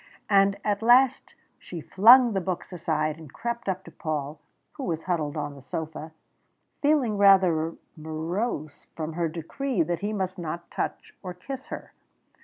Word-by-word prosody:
And 195 0 +4
at 205 -1 0
last 245 +3 +4 0.2
she 175 - -8
flung 235 - +6
the 195 - 0
books 180 +1 -4
aside, 155 -2 -1
and 155 -4 -12
crept 235 +1 -4
up 190 0 -2
to - - -12
Paul, 150 -3 -4 0.3
who 285 - -8
was 165 -6 -2
huddled 160 -4 -1
on 145 -1 -3
the 140 - -12
sofa, 160 +3 -6 0.7
feeling 275 -8 +2
rather 185 -5 +5 0.2
morose 160 +1 -4
from 160 0 -4
her 170 0 -1
decree 175 - -2
that 170 +1 -2
he 205 +3 -2
must 190 -3 -3
not 170 +1 -6
touch - - -4
or 180 -2 -7
kiss 265 +8 -8
her. - - -8
175 Hz, 160 wpm, -26 LUFS, 160-205 Hz, 0.7 s, flung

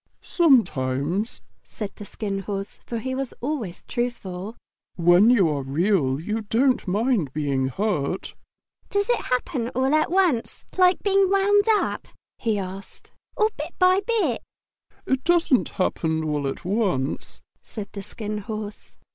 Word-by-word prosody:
"Sometimes," 185 - +2 0.2
said 210 -3 -6
the 205 - -9
Skin 200 -1 -4
Horse, 195 0 -5
for 235 - -3
he 260 +3 -3
was 265 -1 -3
always 240 - -4
truthful. 220 -4 -4 0.4
"When 175 +5 +5
you 215 -8 +5
are 145 -2 -1
Real 140 -1 +1
you 215 +7 -2
don't 240 +3 +1
mind 205 - +1
being 140 -3 0
hurt." 180 - -2 0.6
"Does 405 +3 +1
it - - 0
happen 250 -1 -1
all 260 +3 +2
at 310 0 +3
once, 345 -10 +1
like 365 0 +4
being 390 -1 +3
wound 400 +1 +4
up," 420 - -1 0.3
he 220 -3 0
asked, 195 0 -8 0.3
"or 430 +1 +3
bit - - -5
by 370 +1 +5
bit?" 450 +1 0 0.6
"It 265 0 0
doesn't 335 -7 +3
happen 160 -4 -1
all 150 -2 -1
at 135 - -5
once," 185 - -1 0.2
said 205 -3 -8
the 200 - -6
Skin 210 +1 -5
Horse. 215 0 -7
215 Hz, 140 wpm, -24 LUFS, 180-270 Hz, 0.6 s, When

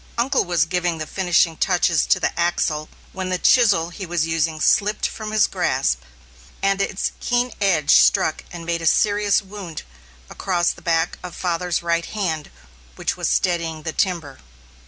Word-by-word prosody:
Uncle 260 +3 +2
was 175 -2 +2
giving 175 -1 -1
the 155 - -4
finishing 175 -1 +1
touches 175 -2 +1
to - - +3
the - - -1
axle, 165 -3 -1 0.2
when 185 -1 -4
the 185 - 0
chisel 195 -6 +4
he 190 - -8
was 170 -3 -1
using 165 -1 -1
slipped 210 +6 +2
from 215 -1 -7
his 215 -1 +4
grasp, - - 0 0.6
and 195 0 +2
its 195 - -1
keen 245 0 0
edge 170 -8 +2
struck - - +4
and 170 -1 -8
made 170 0 -2
a 165 - -1
serious 205 +1 +2
wound 190 -5 -8 0.4
across 175 - 0
the - - -12
back 165 -1 0
of 180 -2 -8
father's 175 -1 -1
right 170 0 0
hand 165 -8 -3 0.5
which - - -2
was - - -2
steadying 165 -3 0
the 160 - -4
timber. 170 -8 -2
175 Hz, 165 wpm, -21 LUFS, 165-195 Hz, 0.6 s, chisel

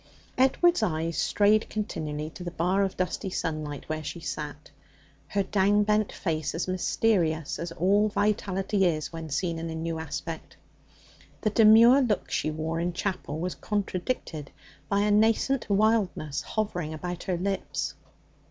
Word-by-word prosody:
Edward's 340 +7 +4
eyes 165 0 -1
strayed 210 +1 +3
continually 155 -8 -4
to 180 - -9
the 175 - -3
bar 180 +3 +1
of 195 -1 -1
dusty 185 +2 -2
sunlight 155 -5 -4
where 155 0 -3
she 170 - -5
sat, 150 -2 -6 0.6
her 200 -1 0
down 205 +1 +3
bent 210 0 +1
face 155 -5 -2
as 170 - -2
mysterious 180 -4 +1
as 170 0 -4
all 200 +5 +3
vitality 200 -1 0
is 155 -1 -2
when 165 -1 -6
seen 165 +3 -1
in 165 0 -4
a 160 - -4
new 165 0 -3
aspect. 160 +1 -6 0.8
The 215 - +1
demure 230 +5 +7
look 225 -6 0
she - - 0
wore 160 +1 -2
in 175 +1 -1
chapel 180 -4 -3
was 180 +2 -2
contradicted 185 - -3 0.4
by 200 0 +2
a 210 0 +2
nascent 225 +5 +2
wildness 200 -8 +1
hovering 175 -6 -3
about 175 +2 -5
her 180 -2 0
lips. 195 +2 -2
180 Hz, 150 wpm, -27 LUFS, 160-210 Hz, 0.8 s, demure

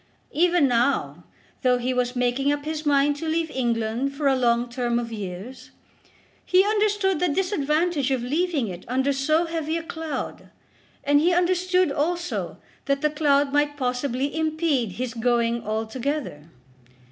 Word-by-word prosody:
Even 345 -2 +3
now, 245 +2 0 0.4
though 250 -1 +3
he 250 +1 -1
was 250 0 -1
making 250 +3 +1
up 290 0 -2
his 310 -1 -3
mind 285 0 +3
to 325 - -5
leave 325 0 -1
England 235 +2 -1
for 290 +1 -3
a 270 - +4
long 240 -1 +2
term 240 -1 -1
of 235 -1 -3
years, 205 +3 -7 0.7
he 370 +2 +4
understood 415 -4 +1
the 360 - +1
disadvantage 315 -4 0
of 260 -3 0
leaving 300 -1 0
it 180 -1 -7
under 265 +3 +1
so 310 +5 +1
heavy 325 -1 -2
a 330 - -5
cloud; 320 -5 -5 0.5
and 290 0 +4
he 340 +4 +3
understood 365 -1 +2
also 345 +5 -2 0.3
that 275 0 0
the 300 -1 +1
cloud 285 -2 +2
might 290 0 +1
possibly 255 +1 -1
impede 310 - 0
his 245 +2 -4
going 235 0 +1
altogether. 220 - -3
280 Hz, 150 wpm, -24 LUFS, 245-320 Hz, 0.7 s, a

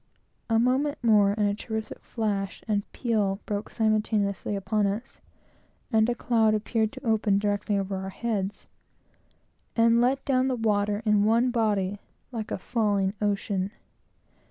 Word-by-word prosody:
A 225 - +3
moment 265 +5 +2
more, 205 -3 +4
and 210 -1 +2
a 200 - +1
terrific 220 +1 -5
flash 200 -4 -3
and 205 -2 -1
peal 210 -5 0
broke 205 0 -3
simultaneously 215 -2 0
upon 205 +1 0
us, 215 +7 -5 0.7
and 220 +1 +3
a 240 - 0
cloud 225 -2 +2
appeared 220 0 0
to 265 -1 -10
open 220 -3 +2
directly 205 0 0
over 195 0 -2
our 190 0 -5
heads 205 -2 -3 1.1
and 230 0 +4
let 260 +3 +1
down 260 -1 +2
the 260 - 0
water 210 -2 0
in 210 -1 +4
one 230 +4 +3
body, 205 -4 0 0.3
like 225 -3 -5
a - - -2
falling 200 -2 0
ocean. 200 -2 0
215 Hz, 145 wpm, -27 LUFS, 200-230 Hz, 1.1 s, more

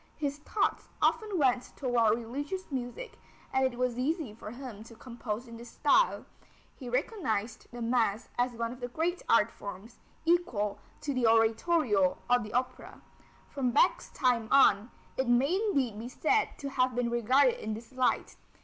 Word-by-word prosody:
His 290 -1 -2
thoughts 390 +7 -1
often 425 -4 +1
went 255 -4 +1
toward 235 -5 +2
religious 285 +11 -5
music, 270 - -5 0.3
and 265 - +3
it 240 - -11
was 250 -1 -1
easy 295 - -1
for 215 -1 -9
him 240 -3 -8
to 230 - -13
compose 235 -1 -6
in 230 0 -10
this 235 +1 -10
style. 300 - +2 0.5
He 250 - -8
recognized 240 - -2
the 240 -1 -6
mass 230 -2 +1
as 245 0 0
one 230 0 -3
of 250 - -9
the 245 - -4
great 335 +8 -2
art 230 -1 +4
forms, 200 +3 -9 0.3
equal 250 - +1 0.2
to 285 - -2
the 250 -3 +2
oratorio 225 - +3
or 245 0 +4
the 210 -2 -7
opera. 255 +1 -3 0.5
From 265 -3 0
Bach's 245 - +2
time 245 -3 +1
on, 230 -5 +5 0.3
it 265 - 0
may 255 +7 +3
indeed 275 - 0
be 235 +2 -6
said 410 - +1
to 280 -1 -5
have 255 -2 +1
been 240 -1 0
regarded 250 +3 +3
in 215 0 -2
this 225 +2 -11
light. 255 -1 0
245 Hz, 165 wpm, -30 LUFS, 230-280 Hz, 0.5 s, on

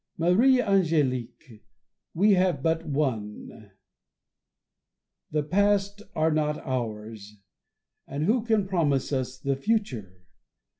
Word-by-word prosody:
Marie 210 +11 +4
Ang^lique, 145 - 0 0.5
we 205 +5 +4
have 180 -7 +1
but 165 0 0
one: 110 -7 -3 1.6
the 150 0 -1
past 200 +4 +1
are 160 +1 +2
not 150 -1 0
ours, 110 -4 -5 0.7
and 140 +2 -3
who 220 +7 +2
can 220 -4 +1
promise 150 -8 0
us 130 -1 -2
the 135 +1 -1
future 130 - -2
150 Hz, 100 wpm, -26 LUFS, 125-195 Hz, 1.6 s, Marie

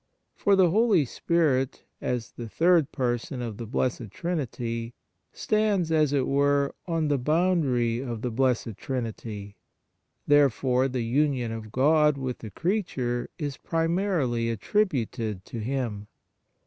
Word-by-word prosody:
For 200 -2 +3
the 185 -3 +4
Holy 210 -6 +4
Spirit, 135 -2 0 0.2
as 120 -2 -2
the 120 -2 -8
Third 165 +1 +3
Person 125 0 -2
of 115 -4 -4
the 115 - -6
Blessed 120 -1 -1
Trinity, 120 - -3 0.4
stands, 210 -6 +1
as 155 -3 +3
it 140 -3 +1
were, 140 0 +2
on 165 -2 0
the 145 -2 +1
boundary 140 -6 +1
of 120 -4 -5
the 125 - -1
Blessed 120 -3 0
Trinity; 110 -5 -5 0.7
therefore 135 -2 +3
the 125 -2 -2
union 130 -1 +1
of 110 -1 -7
God 150 +3 +4
with 130 -2 -4
the 110 - -8
crea 190 - 0
ture 120 -8 -3
is 145 -3 -4
primarily 165 - 0
attributed 115 - -1
to 115 - -6
Him. 110 -4 -3
130 Hz, 135 wpm, -26 LUFS, 115-160 Hz, 0.7 s, the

